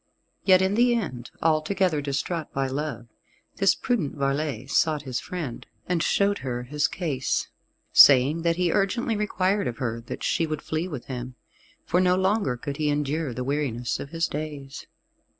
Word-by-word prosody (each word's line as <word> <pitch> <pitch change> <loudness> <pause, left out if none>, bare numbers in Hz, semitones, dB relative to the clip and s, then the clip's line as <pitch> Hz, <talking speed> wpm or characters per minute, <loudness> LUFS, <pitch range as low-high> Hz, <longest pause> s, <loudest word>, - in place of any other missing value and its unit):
Yet 185 -1 +6
in 190 +1 +1
the 240 +2 +4
end, 130 - -4
altogether 160 +1 +2
distraught 145 +3 -3
by 135 0 0
love, 135 -3 -3 0.5
this - - +4
prudent 210 - -1
varlet 140 -2 -2
sought 155 -3 +2
his 130 -3 -3
friend, 160 -10 -6 0.2
and 180 -2 +1
showed 200 +4 +2
her 125 -2 -4
his 145 +3 0
case, 140 -4 -2 0.4
saying 140 +4 +7
that 165 0 +1
he 180 -1 +1
urgently 220 +5 +1
required 200 -4 0
of 120 - -4
her 115 -3 -3
that - - -6
she 165 - +1
would 155 -1 -4
flee 160 +3 -2
with 145 -9 -6
him, 125 -1 -6 0.5
for 180 - +2
no 180 0 +4
longer 190 - +1
could 140 +2 -5
he 150 -1 0
endure 145 0 -1
the 125 +1 -4
weariness 130 -4 -2
of 140 - -6
his 165 +1 -1
days. 145 -2 -6
150 Hz, 170 wpm, -25 LUFS, 135-180 Hz, 0.5 s, saying